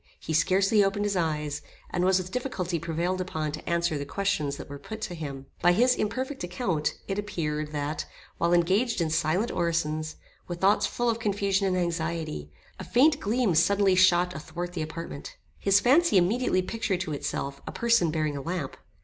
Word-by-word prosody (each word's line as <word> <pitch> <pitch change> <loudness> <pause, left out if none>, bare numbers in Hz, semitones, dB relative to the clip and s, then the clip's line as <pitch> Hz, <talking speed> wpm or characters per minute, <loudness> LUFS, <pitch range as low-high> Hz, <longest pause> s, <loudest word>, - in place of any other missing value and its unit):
He 160 - -4
scarcely 195 +6 +4
opened 200 +1 0
his 205 -1 0
eyes, 150 -4 -1 0.3
and 175 - 0
was 185 0 +4
with 185 0 -4
difficulty 190 -9 -2
prevailed 170 +3 -1
upon 160 -4 -3
to 155 - -7
answer 170 -3 +1
the - - -3
questions 155 -8 -1
that - - -8
were 140 0 -8
put 220 +7 -8
to 180 - -3
him. 140 -5 -6 0.2
By 175 0 +5
his 245 +6 +4
imperfect 255 +4 -3
account, 175 -4 -1
it 195 +1 -2
appeared, 155 -7 -3
that 145 +1 -3 0.3
while 170 0 +2
engaged 190 +8 +2
in 165 -2 0
silent 165 +8 +1
orisons, 155 -2 -1 0.3
with 175 -1 -5
thoughts 195 +3 +3
full 240 - -2
of 230 -1 +1
confusion 200 -2 +1
and 185 -1 +1
anxiety, 165 - -2 0.3
a - - -5
faint 285 +4 +4
gleam 220 -1 +1
suddenly 195 +4 +4
shot 180 -1 +4
athwart 170 +3 -6
the 170 - -3
apartment. 160 -2 -7 0.2
His 195 0 +4
fancy 285 - +4
immediately 185 +1 +2
pictured 195 -2 -2
to 165 -5 -3
itself, 140 -1 -4
a - - -3
person 235 -7 +2
bearing 155 -2 -1
a 140 - -4
lamp. 165 -2 -4
175 Hz, 185 wpm, -27 LUFS, 155-200 Hz, 0.3 s, By